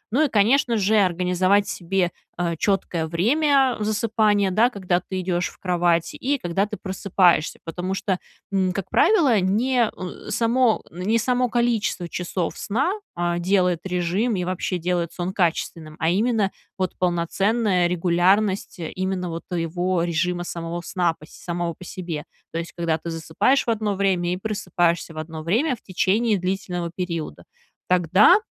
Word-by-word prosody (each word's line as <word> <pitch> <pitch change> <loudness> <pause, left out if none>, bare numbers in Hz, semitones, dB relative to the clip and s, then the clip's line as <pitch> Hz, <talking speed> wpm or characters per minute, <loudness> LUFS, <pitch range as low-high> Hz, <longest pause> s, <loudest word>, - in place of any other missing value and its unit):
Ну, 310 +3 +4
и, 285 - -1
конечно 230 +3 +3
же, 210 +1 +2
организовать 185 +2 +2
себе, 180 0 -1 0.3
э, 170 -1 -1
четкое 195 -6 0
время 265 - +2
засыпания, 210 -2 +1
да, 225 +6 +4
когда 185 -6 0
ты 185 +1 -5
идешь 180 -1 -1
в - - -18
кровать, 175 -2 +1
и 280 +2 -1
когда 195 +1 -1
ты 210 - -6
просыпаешься. 185 -4 +2
Потому 180 +3 -3
что, 195 -2 -1 0.3
м, 185 -2 +1
как 195 -1 -5
правило, 295 - +4
не, 230 +6 +2
э, 185 +3 -8
само 230 +2 +2
не 185 +7 0
само 250 +1 +1
количество 230 -6 0
часов 175 0 -3
сна, 265 - 0 0.2
а, 175 0 -1
делает 180 -1 +2
режим 180 +6 0
и 180 - -1
вообще 185 0 -2
делает 175 -1 -1
сон 180 +1 -3
качественным, 165 -3 -1
а 160 +1 +2
именно 215 0 +1 0.3
вот 185 -2 -2
полноценная 180 +2 +1
регулярность 185 +4 +1
именно 180 +2 -3
вот 165 0 -5
твоего 175 0 -1
режима 175 +1 0
самого 170 0 -5
сна 175 -2 0
пос 155 - -14
самого 170 -1 -4
по 180 - -13
себе. 170 -4 -6 0.3
То 165 - -3
есть 170 - -6
когда 165 -2 -1
ты 170 - -6
засыпаешь 165 +11 +1
в - - -2
одно 215 -2 -1
время 185 -3 +1
и 180 - -1
просыпаешься 175 -5 -1
в - - -11
одно 160 0 -6
время 235 - +1
в - - -22
течение 205 +3 +1
длительного 180 -2 -3
периода. 170 - -4 0.4
Тогда 180 - +6
185 Hz, 155 wpm, -23 LUFS, 175-210 Hz, 0.4 s, Тогда